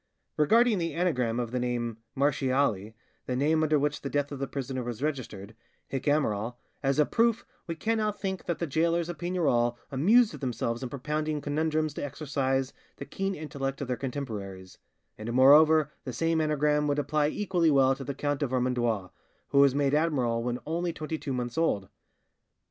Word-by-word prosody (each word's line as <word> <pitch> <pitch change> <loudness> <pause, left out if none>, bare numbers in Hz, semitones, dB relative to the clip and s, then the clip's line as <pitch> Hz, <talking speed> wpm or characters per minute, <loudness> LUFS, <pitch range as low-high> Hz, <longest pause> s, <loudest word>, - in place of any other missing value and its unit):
Regarding 220 +7 +4
the 165 -3 -2
anagram 125 -10 0
of 120 -2 -3
the 125 - -1
name 120 -2 -2 0.2
Marchiali 130 -6 +1 0.3
(the 125 - -1
name 155 +4 +2
under 155 -1 +3
which 145 +1 -1
the 140 - -4
death 145 0 -1
of 140 - -6
the 135 - -2
prisoner 130 -1 -4
was 120 +1 -5
registered), 115 -8 -4 0.3
'hic 135 -1 -4
amiral', 120 -6 +1 0.3
as 135 -1 +1
a 150 - +5
proof, 230 +4 +1 0.2
we 165 - -3
cannot 215 +2 -1
think 190 -2 -3
that 170 - -1
the 170 - -2
gaolers 165 +3 +1
of 175 - -6
Pignerol 150 -10 +1 0.2
amused 210 - +4
themselves 120 -3 -2
in 130 - -4
propounding 150 +3 -2
conundrums 155 +1 -1
to - - -5
exercise 135 -2 -1 0.2
the 140 - -8
keen 195 +4 -3
intellect 140 -3 -4
of 140 - -4
their 125 - -1
contemporaries; 105 -9 -6 0.4
and 110 +2 -4
moreover 150 +4 +6
the 130 - -5
same 165 +5 +1
anagram 150 -1 +1
would 145 0 0
apply 150 0 +1
equally 175 -1 +1
well 135 -2 +4
to 135 - -7
the 140 +1 -5
Count 145 +1 -2
of 145 - 0
Vermandois, 120 -6 0 0.4
who 140 - +3
was 140 -1 +5
made 140 -1 +1
admiral 135 -7 +1
when 120 +1 -2
only 170 +2 -1
twenty 155 0 -5
two 140 - -5
months 125 +1 -2
old. 100 - 0
140 Hz, 180 wpm, -28 LUFS, 125-155 Hz, 0.4 s, moreover